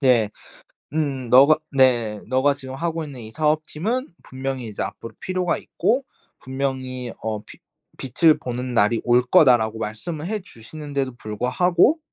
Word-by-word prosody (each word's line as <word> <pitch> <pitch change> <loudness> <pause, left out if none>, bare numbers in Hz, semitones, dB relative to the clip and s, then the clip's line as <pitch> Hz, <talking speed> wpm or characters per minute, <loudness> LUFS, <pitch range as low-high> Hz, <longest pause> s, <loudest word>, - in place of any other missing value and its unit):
네. 120 -6 +4 0.6
음. 140 -6 -1
너가 140 +5 +7
네. 120 -6 +3
"너가 130 +2 +3
지금 130 -1 -8
하고 165 0 -2
있는 135 -4 -9
이 110 - -9
사업팀은 155 - -1
분명히 130 -1 -5
이제 105 -2 -5
앞으로 115 - -7
필요가 185 -2 -1
있고 245 +9 0 0.3
분명히 130 -2 -4
어 110 -1 -3
비 - - -14 0.4
빛을 150 +5 +3
보는 125 0 -4
날이 115 0 +2
올 120 +1 +4
거다."라고 120 -4 +4
말씀을 150 +10 -5
해 215 +1 -2
주시는데도 140 - -5
불구하고 170 - +2
130 Hz, 295 characters per minute, -23 LUFS, 120-155 Hz, 0.6 s, 너가